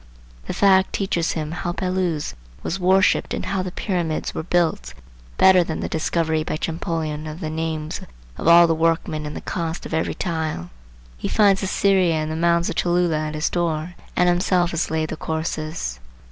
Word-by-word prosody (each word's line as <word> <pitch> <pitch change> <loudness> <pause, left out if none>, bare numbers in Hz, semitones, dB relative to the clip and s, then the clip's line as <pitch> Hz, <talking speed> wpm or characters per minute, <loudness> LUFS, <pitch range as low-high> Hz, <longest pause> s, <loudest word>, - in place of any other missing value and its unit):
The - - -2
fact 190 -1 +4
teaches 175 -4 0
him 155 -1 -3
how 175 0 -3
Belus 180 -4 -1 0.3
was 190 - -2
worshipped 190 +1 +3
and - - -4
how 195 -1 -1
the 185 -1 -4
Pyramids 175 -5 -2
were - - -3
built, 170 - 0 0.4
better 185 -2 +6
than 160 -2 -4
the - - -2
discovery 160 -1 0
by 155 - -3
Champollion 160 -2 -3
of 155 +2 -7
the 155 -4 -4
names 160 -1 -3 0.3
of - - -4
all 170 +1 +9
the 165 - +2
workmen 160 -1 0
and 150 - -7
the - - -5
cost 165 -2 -4
of - - -6
every 160 - 0
tile. 160 - -3 0.5
He - - -3
finds 200 -3 +4
Assyria 190 -3 +2
and 155 0 -2
the - - -2
Mounds 170 +1 +2
of - - -3
Cholula 175 -3 +1
at 155 - -5
his 155 +2 0
door, 170 -1 -1 0.2
and 180 - +3
himself 175 0 +2
has 165 0 -1
laid 160 -1 -1
the 160 - -4
courses. 160 - -3
165 Hz, 185 wpm, -22 LUFS, 155-180 Hz, 0.5 s, all